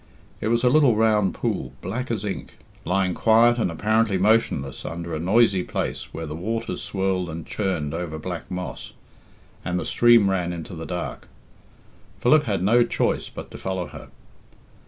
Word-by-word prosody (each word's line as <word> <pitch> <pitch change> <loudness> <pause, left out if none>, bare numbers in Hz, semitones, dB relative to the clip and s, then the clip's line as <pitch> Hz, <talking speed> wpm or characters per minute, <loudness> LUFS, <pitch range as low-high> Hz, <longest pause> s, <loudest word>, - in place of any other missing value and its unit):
It - - -2
was 115 +2 +1
a 125 - +5
little 140 -5 +5
round 105 -4 +2
pool, 65 -1 -2
black 120 +8 -4
as 110 -3 -2
ink, 100 - -5 0.3
lying 90 +1 +1
quiet 115 +3 +4
and 110 - +1
apparently 105 +4 +1
motionless 95 - +1
under 85 +1 -5
a 80 - -2
noisy 95 +2 +3
place - - -4
where 80 - -5
the 75 - -6
waters 110 +2 -3
swirled 95 -2 -1
and 80 0 -6
churned 90 -8 -2
over 85 -2 -4
black 85 +2 -6
moss, 90 -1 -6 0.7
and 90 0 -1
the - - -4
stream 120 -4 +5
ran 90 -2 0
into 85 +1 -7
the 80 -1 -7
dark. 90 -1 -5 0.9
Philip 150 +4 +4
had 100 -6 -1
no 120 +5 +5
choice - - -1
but - - -9
to - - -9
follow 95 -2 -3
her. - - -10
95 Hz, 170 wpm, -24 LUFS, 85-115 Hz, 0.9 s, a